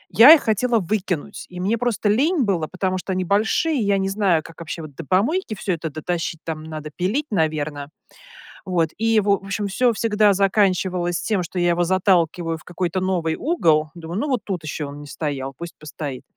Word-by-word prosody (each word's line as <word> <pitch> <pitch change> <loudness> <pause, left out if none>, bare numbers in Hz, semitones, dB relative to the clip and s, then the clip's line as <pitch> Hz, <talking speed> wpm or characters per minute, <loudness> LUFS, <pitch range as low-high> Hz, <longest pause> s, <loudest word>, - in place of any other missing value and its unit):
я 245 +8 +10
их 320 - +5
хотела 230 +2 +2
выкинуть, 190 -1 -3
и 180 0 -8
мне 200 +5 +1
просто 240 -3 0
лень 285 - +2
было. 175 -7 0
Потому 185 0 -2
что 190 - -4
они 185 0 -1
большие, 220 - +1
и - - 0
я 200 0 +2
не 195 0 0
знаю, 195 -6 +2
как 165 - -13
вообще 165 0 -6
вот 150 -2 -10
до 165 - -7
помойки 220 - +1
всё 190 -2 -2
это 165 -1 -4
дотащить, 165 +1 -3
там 160 -1 -4
надо 155 -1 -7
пилить, 210 +12 0
наверно, 155 -5 -1 0.8
вот. 170 -3 +1
И 225 +1 +3
в 205 - -2
в 205 - 0 0.2
общем 200 +1 -2
всё 245 +5 +2
всегда 210 -1 +3
заканчивалось 185 -3 +1
тем, 200 -5 0
что 180 +2 -5
я 175 - +2
его 175 0 +2
заталкиваю 175 -2 +1
в - - -17
какой-то 180 +1 -2
новый 175 -4 0
угол. 160 - +2
Думаю: 170 +3 -5
"Ну, - - -1
вот 255 - +1
тут 185 -5 -3
еще 155 0 -4
он 145 +1 -8
не 145 - -10
стоял, 140 -3 -4
пусть 170 0 -8
постоит". 150 -3 -7
185 Hz, 205 wpm, -22 LUFS, 160-210 Hz, 0.8 s, я